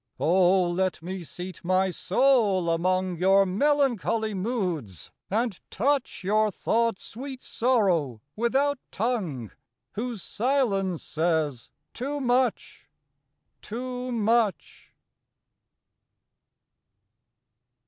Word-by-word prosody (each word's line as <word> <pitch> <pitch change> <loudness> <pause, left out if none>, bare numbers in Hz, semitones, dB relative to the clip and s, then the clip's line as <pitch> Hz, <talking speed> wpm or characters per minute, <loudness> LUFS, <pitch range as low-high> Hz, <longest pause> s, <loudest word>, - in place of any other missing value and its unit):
Oh, 180 +1 +4
let 185 -1 -1
me 185 +2 -5
seat 180 +3 -8
my 185 +1 +2
soul 200 -5 +2
among 185 +1 0
Your 195 +3 +4
melancholy 230 -1 +1
moods! 185 - -3 0.2
and 220 -1 -1
touch 275 -1 0
Your 215 +3 +2
thoughts' 230 +1 0
sweet 260 +3 -8
sorrow 185 - +1 0.2
without 270 +5 +1
tongue, 185 - -2 0.4
Whose 230 -2 -4
silence 205 - 0
says 155 -6 -1 0.2
too 285 +4 -3
much, 255 -1 0 0.7
too 250 +2 -5
much! 225 -3 0
205 Hz, 85 wpm, -26 LUFS, 180-245 Hz, 0.7 s, Oh